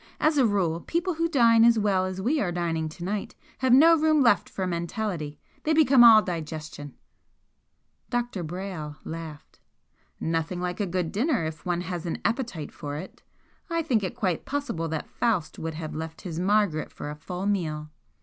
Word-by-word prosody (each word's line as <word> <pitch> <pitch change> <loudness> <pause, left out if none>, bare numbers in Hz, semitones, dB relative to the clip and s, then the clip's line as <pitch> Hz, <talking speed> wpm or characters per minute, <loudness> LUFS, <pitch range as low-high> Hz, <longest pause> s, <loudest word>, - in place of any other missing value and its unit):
"As 305 -1 +3
a 255 - +5
rule 180 -6 0
people 345 - -1
who 330 +1 0
dine 230 -6 +5
as 235 0 +6
well 195 -3 +2
as 185 0 -5
we 275 +10 +1
are 180 - 0
dining 165 -2 -1
to 165 +2 -10
night 200 +3 -3 0.2
have 260 -1 +2
no 320 +6 +8
room 310 -1 +3
left 205 -7 +3
for 190 - -3
mentality 170 -3 -3 0.2
they 315 - +1
become 275 -5 +6
all 220 -2 +9
digestion!" 155 -4 -6 1.1
Dr. 240 -6 -2
Brayle 170 -3 -5
laughed. 160 -2 -8 0.6
"Nothing 165 +2 -1
like 180 +1 -3
a 205 - 0
good 180 -2 -2
dinner 235 - +1
if 160 +2 -6
one 175 -1 0
has 180 -1 -4
an 165 - -2
appetite 225 - -2
for 145 -1 -6
it. 185 - -9 0.5
I 335 -1 0
think 245 -8 +1
it 185 - -4
quite 185 -5 -1
possible 265 - -3
that 160 -1 -4
Faust 215 -9 -1
would 160 -1 -4
have 155 -1 -5
left 160 +1 -6
his 170 -3 -5
Margaret 195 -4 +1
for 145 - -6
a - - -6
full 180 +5 -6
meal!" 155 -7 -1
185 Hz, 180 wpm, -26 LUFS, 160-235 Hz, 1.1 s, all